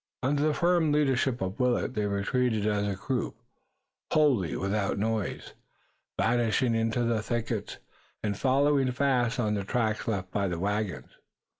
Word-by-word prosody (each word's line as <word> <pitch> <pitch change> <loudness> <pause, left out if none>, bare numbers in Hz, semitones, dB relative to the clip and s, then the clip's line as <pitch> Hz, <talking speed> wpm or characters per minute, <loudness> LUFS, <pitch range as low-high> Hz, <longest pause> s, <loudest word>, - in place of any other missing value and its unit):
Under 140 +2 +1
the 150 - +1
firm 175 -3 +2
leadership 135 -4 +1
of 95 +4 -3
Willet 125 0 +1
they 105 -3 -1
retreated 105 +2 0
as 105 -1 +1
a 100 - -1
group, 125 +6 -3 0.8
wholly 135 - +3
without 100 +1 -1
noise, 110 0 -2 0.7
vanishing 120 +1 +2
in 115 0 +1
the 115 -1 0
thickets, 115 +1 -3 0.5
and 105 -1 -1
following 135 +2 +2
fast 125 -3 +1
on 105 -3 +1
the 100 -1 -1
tracks 110 +1 -1
left 95 -5 -2
by 100 0 0
the 90 -2 -2
wagons. 100 +1 -3
115 Hz, 145 wpm, -28 LUFS, 105-130 Hz, 0.8 s, wholly